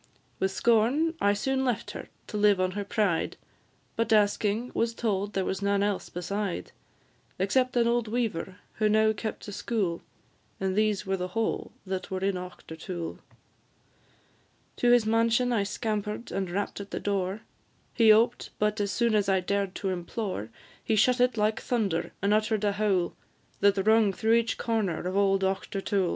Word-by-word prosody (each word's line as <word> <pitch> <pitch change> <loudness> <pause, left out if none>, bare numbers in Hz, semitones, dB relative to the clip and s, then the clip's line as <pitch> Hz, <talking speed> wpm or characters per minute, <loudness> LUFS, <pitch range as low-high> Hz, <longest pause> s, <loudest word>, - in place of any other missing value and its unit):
With 190 - +1
scorn 235 +10 +2
I 200 0 +4
soon 265 +6 0
left 245 -5 -1
her - - -8 0.2
to - - -8
live 205 -2 +4
on 185 0 +1
her 205 +2 -3
pride; 200 -5 0 0.6
But, 230 0 -1
asking, 215 +2 +2
was 230 0 0
told 205 -3 -1
there 190 -1 0
was 190 - -2
none 200 0 +2
else 205 -2 -1
beside, 185 - -3 0.7
Except 250 +7 +1
an 235 -1 +3
old 235 -1 +1
weaver, 215 -6 -2 0.2
who 215 -1 +2
now 220 +1 +4
kept 215 +1 -5
a - - -5
school, 200 -4 -2 0.6
And 190 -1 -1
these 210 -1 +1
were 190 0 0
the 180 0 -3
whole 225 - -1
that 190 -1 -4
were 185 -1 -3
in 195 +1 +1
Auchtertool. 180 -1 -7 1.6
To 245 - +2
his 240 -2 +5
mansion 230 +2 +2
I 220 - +2
scamper'd, 210 +1 -3
and 190 -2 -2
rapp'd 200 +2 -3
at 200 - -9
the - - -4
door; 200 0 -1 0.5
He 225 -2 +6
oped, 225 +3 +3
but 210 0 0
as 200 -1 -1
soon 235 -2 +1
as 205 -2 +2
I 190 -1 +3
dared 195 +1 -1
to 195 - -2
implore, 185 - -4 0.3
He 220 - +1
shut 250 +4 +3
it 250 -2 +3
like 215 +1 +1
thunder, 200 -9 -1
and 200 +1 +3
utter'd 215 0 +1
a 205 - +3
howl 200 -4 +1 0.5
That 200 -1 +3
rung 220 -2 +4
through 220 +4 +1
each 230 0 +2
corner 215 -7 -1
of 185 +1 -2
old 195 -1 +3
Auchtertool. 195 0 0
205 Hz, 170 wpm, -28 LUFS, 195-225 Hz, 1.6 s, He